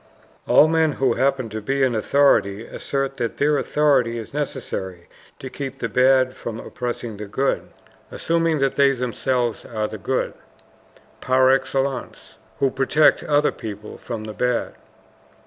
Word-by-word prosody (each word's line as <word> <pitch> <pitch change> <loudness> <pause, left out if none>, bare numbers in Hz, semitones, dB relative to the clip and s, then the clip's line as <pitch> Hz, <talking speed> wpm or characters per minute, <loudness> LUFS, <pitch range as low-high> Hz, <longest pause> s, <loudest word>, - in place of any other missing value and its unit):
All 155 - +6
men 160 -1 +2
who 130 -3 +1
happen 135 -2 0
to 110 +1 -5
be 135 +5 0
in 130 -2 +2
authority 110 -3 +2
assert 135 -1 -3
that 120 -2 -3
their 145 0 +2
authority 135 -6 +2
is 115 +2 -8
necessary 95 -11 -5 0.3
to 135 - -8
keep 135 0 -6
the 115 - -2
bad 130 +2 +3
from 115 -3 -6
oppressing 120 -3 -5
the 105 0 -7
good, 130 +7 -1 0.4
assuming 165 -1 0
that 135 -1 +1
they 140 -1 +4
themselves 125 -1 -1
are 110 -2 -3
the - - -8
good - - -1 0.9
PAR 130 0 +4
EXCELLENCE, 135 -1 -2 0.2
who 135 -2 +1
protect 135 +3 +3
other 150 0 +2
good - - -19
people 105 -1 -8
from 115 -3 -6
the 110 0 -7
bad. 125 +1 -1
130 Hz, 150 wpm, -22 LUFS, 115-140 Hz, 0.9 s, All